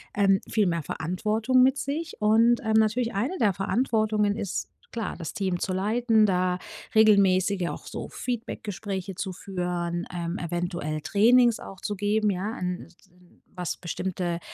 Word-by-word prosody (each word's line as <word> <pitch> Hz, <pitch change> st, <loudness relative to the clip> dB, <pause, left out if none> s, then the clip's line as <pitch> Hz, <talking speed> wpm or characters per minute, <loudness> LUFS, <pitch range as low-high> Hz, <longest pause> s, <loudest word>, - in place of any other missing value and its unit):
ähm, 195 Hz, -1 st, +4 dB
viel 210 Hz, -3 st, +2 dB
mehr 170 Hz, -2 st, -1 dB
Verantwortung 215 Hz, -, +1 dB
mit 265 Hz, +2 st, +4 dB
sich. 310 Hz, +4 st, -3 dB
Und, 225 Hz, +3 st, +4 dB
ähm, 220 Hz, -1 st, 0 dB
natürlich 220 Hz, +2 st, +2 dB
eine 255 Hz, -, -1 dB
der 210 Hz, -5 st, +3 dB
Verantwortungen 215 Hz, 0 st, +1 dB
ist, 200 Hz, -4 st, -3 dB, 0.2 s
klar, 225 Hz, -2 st, -3 dB
das 165 Hz, -4 st, -5 dB
Team 185 Hz, -3 st, -1 dB
zu 190 Hz, -, -2 dB
leiten, 220 Hz, +3 st, +2 dB
da 180 Hz, -2 st, +1 dB, 0.4 s
regelmäßige 200 Hz, -3 st, +4 dB
auch -, -, -6 dB
so -, -, -6 dB
Feedback-Gespräche 205 Hz, -5 st, -4 dB
zu 190 Hz, +1 st, -4 dB
führen, 175 Hz, -2 st, -3 dB
ähm, 170 Hz, 0 st, -3 dB
eventuell 175 Hz, -3 st, -3 dB
Trainings 235 Hz, +6 st, +4 dB
auch 195 Hz, -, -10 dB
zu 205 Hz, -, -3 dB
geben, 205 Hz, +1 st, +1 dB
ja, 200 Hz, +4 st, -3 dB
hm, 180 Hz, 0 st, -3 dB
s 170 Hz, -, -22 dB
hm, 180 Hz, -1 st, -25 dB
was 180 Hz, -2 st, -3 dB
bestimmte, 175 Hz, -1 st, -3 dB
200 Hz, 155 wpm, -26 LUFS, 180-220 Hz, 0.4 s, ähm